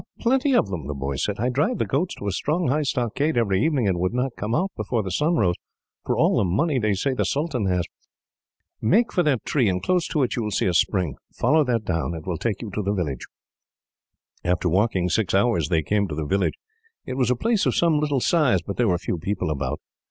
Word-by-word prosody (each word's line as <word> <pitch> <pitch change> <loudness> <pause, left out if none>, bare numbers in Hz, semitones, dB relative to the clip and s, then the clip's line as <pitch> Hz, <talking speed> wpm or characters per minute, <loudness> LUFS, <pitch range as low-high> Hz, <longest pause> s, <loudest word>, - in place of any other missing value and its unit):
"Plenty 265 +3 +2
of 105 - +3
them," 85 -8 -5
the 75 - -4
boy 70 0 -3
said. 100 +9 -2
"I 120 +3 +1
drive 150 - 0
the - - 0
goats 160 +7 -1
to - - -8
a 100 - 0
strong, 155 - 0
high 150 +4 +2
stockade 135 +2 -1
every 100 -3 +2
evening; 140 -9 +1
and 90 -3 0
would 90 +6 -1
not 125 0 -1
come 110 +3 -2
out, 190 +4 0
before 115 -4 -1
the 95 - -4
sun 155 - +1
rose, 90 - +2 0.5
for - - -1
all - - +3
the - - +3
money 130 - +1
they 105 -3 +1
say 135 +8 0
the 130 - 0
sultan 140 -8 -1
has. 90 -1 +1 1.0
"Make 215 - +2
for 180 - +3
that 145 -8 0
tree, 125 -8 +2
and 90 -1 0
close 180 - 0
to 150 -5 0
it 125 - -1
you 120 - -1
will 105 - -2
see 105 - 0
a 90 - +1
spring. 90 - +1
Follow 155 +1 +3
that 115 -4 0
down. 85 -1 -1
It 80 - -8
will 90 -3 -3
take 115 -2 -2
you 110 - -6
to 105 - -2
the 100 0 -1
village." 75 -9 -3 1.2
After 90 +1 0
walking 95 0 +1
for 90 - -2
six 105 -4 +1
hours, 100 -7 +2
they 80 -2 +1
came 100 +4 +1
to 75 - -5
the 75 0 -3
village. 95 +6 0 0.5
It 130 - -4
was 130 -2 +1
a 125 - +3
place 225 - +1
of - - +1
some 165 -3 +3
little 145 -2 0
size, 130 - +2
but 100 - -5
there 120 - +2
were 90 -3 +2
few 85 - -3
people 95 -2 -2
about. 70 -3 -3
110 Hz, 245 wpm, -24 LUFS, 90-145 Hz, 1.2 s, of